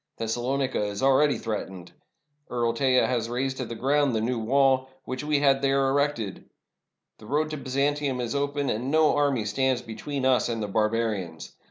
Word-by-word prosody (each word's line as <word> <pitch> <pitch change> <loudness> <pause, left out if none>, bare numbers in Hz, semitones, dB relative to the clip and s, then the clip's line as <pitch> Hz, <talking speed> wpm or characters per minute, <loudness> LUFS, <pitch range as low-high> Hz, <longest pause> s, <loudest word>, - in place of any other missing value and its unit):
Thes 115 0 -2
salonica 130 +1 -1
is 105 +3 -4
already 135 +2 +4
threatened. 95 -5 -5 0.6
Earl 120 -1 0
Teja 130 +1 +3
has 120 -2 -1
razed 130 +2 -2
to 130 - -3
the 115 - -6
ground 140 +1 +1
the 110 - 0
'New 120 +1 -1
Wall, 130 +2 +2
' 135 - -41
which 130 +1 -4
we 150 -1 +1
had 135 -1 +3
there 135 0 +2
erected. 135 -7 -1 0.7
The 110 - -13
road 155 +4 0
to 155 - -3
Byzantium 140 0 -1
is 120 0 -2
open, 145 0 -1
and 120 +5 -3
no 155 +1 +4
army 140 -6 +1
stands 130 +4 0
between 130 +4 -4
us 130 -2 +3
and 115 -1 -2
the - - -2
barbarians. 105 -5 -1
130 Hz, 185 wpm, -26 LUFS, 115-140 Hz, 0.7 s, already